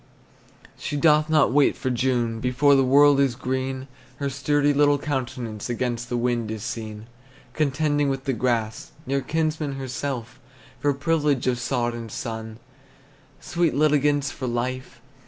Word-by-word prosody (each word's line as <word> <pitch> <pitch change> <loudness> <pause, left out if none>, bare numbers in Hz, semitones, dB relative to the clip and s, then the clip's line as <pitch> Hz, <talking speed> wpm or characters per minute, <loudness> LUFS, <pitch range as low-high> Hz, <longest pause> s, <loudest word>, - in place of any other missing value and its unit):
She 145 - -3
doth 150 +1 +4
not 155 -5 +4
wait 145 0 +4
for 130 - -2
June; 120 -2 0
Before 125 +4 +3
the 135 -1 +5
world 140 +2 +5
is 135 -3 +2
green 130 +1 -3 0.3
Her 140 +1 -3
sturdy 145 +2 +1
little 145 0 +4
countenance 125 -6 -4
Against 120 0 -2
the 120 - -1
wind 120 -2 0
is 110 -1 -5
seen, 110 -2 -6 0.5
Contending 145 -1 +1
with 135 -1 -2
the 135 - -1
grass, 115 -2 -2
Near 135 +1 0
kinsman 155 +1 -1
to - - -7
herself, 130 -2 -5 0.4
For 145 - +2
privilege 145 -2 +1
of 125 -1 +1
sod 120 -1 -1
and 115 -2 -7
sun, 110 -1 -5 0.8
Sweet 170 -4 0
litigants 145 -1 +2
for 130 - -5
life. 125 +1 -3
130 Hz, 150 wpm, -24 LUFS, 120-145 Hz, 0.8 s, the